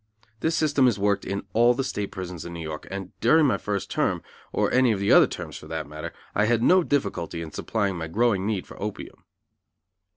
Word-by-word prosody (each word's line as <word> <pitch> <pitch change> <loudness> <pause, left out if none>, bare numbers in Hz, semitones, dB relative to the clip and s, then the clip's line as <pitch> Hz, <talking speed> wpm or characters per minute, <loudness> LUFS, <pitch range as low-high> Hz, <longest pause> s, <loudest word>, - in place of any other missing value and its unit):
This 160 +1 0
system 145 -4 +3
is 115 -5 +2
worked 100 0 +1
in 100 0 -3
all 120 +2 +5
the 135 - -1
State 105 -6 -3
prisons 90 -3 -6
in 85 - -7
New 85 - -6
York, 80 -1 -6
and 95 -1 -6
during 155 +7 +5
my 135 - +2
first 100 -2 -3
term, - - 0 0.3
or - - +1
any 130 -1 +5
of 105 - 0
the 100 - +1
other - - +8
terms - - -7
for - - -12
that 80 -1 -4
matter, 75 +1 -7 0.2
I 105 - +2
had 115 0 +2
no 185 +6 +6
difficulty 100 - -1
in 80 -2 -6
supplying 100 -1 -1
my 80 -1 -4
growing 105 +1 +1
need 105 -4 -1
for - - -13
opium. 105 0 -6
100 Hz, 220 wpm, -25 LUFS, 90-120 Hz, 0.3 s, other